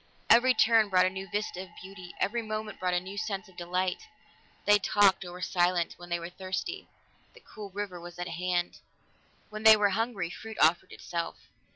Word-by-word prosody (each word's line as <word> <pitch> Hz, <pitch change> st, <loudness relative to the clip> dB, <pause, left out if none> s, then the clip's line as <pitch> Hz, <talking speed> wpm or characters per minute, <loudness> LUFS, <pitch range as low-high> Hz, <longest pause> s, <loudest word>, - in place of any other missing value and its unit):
Every 250 Hz, +2 st, +6 dB
turn 225 Hz, -2 st, +4 dB
brought 185 Hz, -1 st, +4 dB
a 185 Hz, -, +1 dB
new 190 Hz, +1 st, -7 dB
vista 205 Hz, -3 st, -3 dB
of 190 Hz, -, -10 dB
beauty; 185 Hz, -2 st, -10 dB
every 235 Hz, +4 st, 0 dB
moment 215 Hz, -1 st, -5 dB
brought 180 Hz, -1 st, 0 dB
a -, -, +3 dB
new 190 Hz, +3 st, -7 dB
sense 210 Hz, -1 st, -4 dB
of 190 Hz, -, -19 dB
delight. 180 Hz, -, -2 dB, 0.6 s
They 205 Hz, 0 st, +6 dB
talked 200 Hz, -1 st, +3 dB
or 175 Hz, -, -8 dB
were 180 Hz, +1 st, -9 dB
silent; 175 Hz, -1 st, +1 dB
when 175 Hz, 0 st, -12 dB
they 175 Hz, -, 0 dB
were 170 Hz, +1 st, -7 dB
thirsty, 190 Hz, -, -5 dB, 0.5 s
the -, -, -14 dB
cool 210 Hz, -2 st, -9 dB
river 195 Hz, -2 st, -5 dB
was 175 Hz, 0 st, -10 dB
at 175 Hz, 0 st, -4 dB
hand; 175 Hz, +1 st, -2 dB, 0.7 s
when 215 Hz, 0 st, -6 dB
they 220 Hz, 0 st, +8 dB
were 205 Hz, -1 st, +3 dB
hungry, 200 Hz, -4 st, -2 dB
fruit 220 Hz, +2 st, -9 dB
offered 165 Hz, +2 st, +3 dB
itself. 170 Hz, -1 st, -5 dB
190 Hz, 195 wpm, -29 LUFS, 180-215 Hz, 0.7 s, they